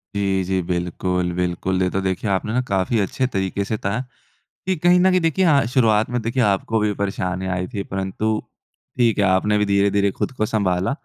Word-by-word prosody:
जी, 95 -1 0
जी। 95 +1 -1
बिल्कुल, 90 0 -1
बिल्कुल। 90 +1 -1
ये 90 - +1
तो - - +2
देखिए 95 +2 -2
आपने 110 +6 0
काफ़ी 100 +4 0
अच्छे 105 +6 0
तरीके 95 +1 -1
से 110 - 0
बताया 100 +1 -2 0.7
कि 190 - +1
कहीं 175 +3 +4
न 190 +1 +5
कहीं 185 0 +3
देखिए 165 +3 +1
हाँ, 145 -6 +4
शुरुआत 115 -3 +2
में 125 0 -1
देखिए 120 +3 0
आपको 105 +1 +1
भी 105 0 +1
परेशानी 95 -2 -3
आई 90 0 -2
थी 100 - -2
परंतु 95 +3 -2 0.7
ठीक 115 -3 +3
है 100 - +3
आपने 95 +3 +2
भी 105 - +2
धीरे-धीरे 100 0 +2
खुद 95 - -3
को 110 - +2
संभाला 95 -4 0
100 Hz, 195 wpm, -21 LUFS, 95-115 Hz, 0.7 s, न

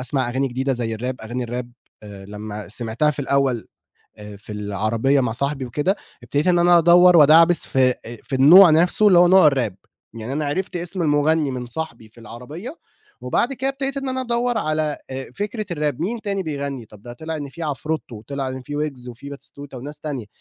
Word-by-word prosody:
أسمع 130 -1 -1
أغاني 130 +2 -1
جديدة 130 +2 -1
زي 120 -3 -3
الراب 125 +3 -5
أغاني 120 +3 -4
الراب 120 +1 -5 0.3
آآ 100 -2 -11
لمّا 105 0 -7
سمعتها 115 +7 0
في 145 - -3
الأول 135 -4 0 0.7
في 105 - -10
العربية 110 +6 0
مع 120 -3 -1
صاحبي 140 +2 -2
وكده، 150 - -1 0.3
ابتديت 145 +7 -1
إن 175 -1 +4
أنا 175 0 +5
أدوّر 175 +1 +6
وأدعبس 165 +3 +6
في 130 -2 +2 0.3
في 135 - -5
النوع 165 +7 +8
نفسْه 175 +6 +4
اللي 180 -3 +6
هو 175 0 +6
نوع 185 -3 +7
الراب، 120 -9 +1 0.4
يعني 115 +3 -6
أنا 150 +2 -2
عرفت 180 +4 -3
اسم 175 +1 -3
المغني 150 0 +2
من 125 -1 -5
صاحبي 120 -4 -6
في 115 - -22
العربية 150 - -9 0.4
وبعد 250 +3 0
كده 265 +1 -2
ابتديت 270 0 -4
إن 270 -1 -3
أنا 260 0 -2
أدوّر 240 -1 0
على 155 -1 -1
آآ، 130 0 -6
فكرة 210 +1 -4
الراب 150 -4 -2
مين 220 +7 -2
تاني 200 -2 -2
بيغني 140 -5 -5
طَب 105 0 -17
ده 120 - -9
طلع 160 +5 -6
إن 145 -2 -6
في 165 +5 -10
عفرُتو 150 -3 -4
وطلع 135 +5 -5
إن 130 0 -6
في 145 +2 -6
ويجز 135 -5 -4
وفي 125 +4 -10
باتيستوتا 140 -1 -11
وناس 145 +4 -8
تانية، 140 -8 -5
140 Hz, 195 wpm, -21 LUFS, 125-170 Hz, 0.7 s, النوع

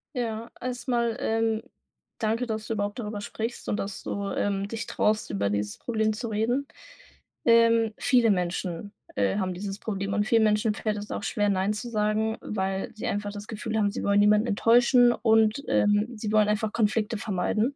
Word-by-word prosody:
Ja, 230 -2 -3
erst 250 +1 -5
mal, 235 -2 +1
ähm, 225 0 0 0.6
danke, 225 +3 -1
dass 220 -1 -3
du 225 - -2
überhaupt 205 -1 -2
darüber 210 -3 -4
sprichst 225 +3 -5
und 205 - 0
dass 195 -1 -4
du, 200 0 -3
ähm, 200 -1 -1
dich 230 +2 -5
traust, 215 -2 0
über 100 0 -1
dieses 105 0 -2
Problem 220 -2 0
zu 230 +2 -5
reden. 235 +6 0 0.8
Ähm, 230 -1 +5
viele 245 -5 +4
Menschen, 180 +1 -2 0.2
äh, 100 - +1
haben 185 -2 -1
dieses 195 +2 -5
Problem 200 -2 -3
und 205 0 +2
vielen 225 -1 +4
Menschen 210 0 +2
fällt 210 0 -2
es 205 0 -7
auch - - -3
schwer, 205 0 0
„Nein“ 195 +1 +1
zu 240 +3 -5
sagen, 215 +1 0
weil 190 -2 -3
sie 220 +3 -6
einfach 205 -3 -2
das 205 0 -8
Gefühl 220 0 -4
haben, 205 -2 +2
sie - - -5
wollen 200 0 +3
niemanden 210 +2 +4
enttäuschen 240 +3 +5
und, 220 +2 +3
ähm, 205 +1 +3
sie 215 -1 -4
wollen 215 -1 +4
einfach 210 0 0
Konflikte 220 0 +1
vermeiden. 215 +5 -1
215 Hz, 185 wpm, -26 LUFS, 205-230 Hz, 0.8 s, Ähm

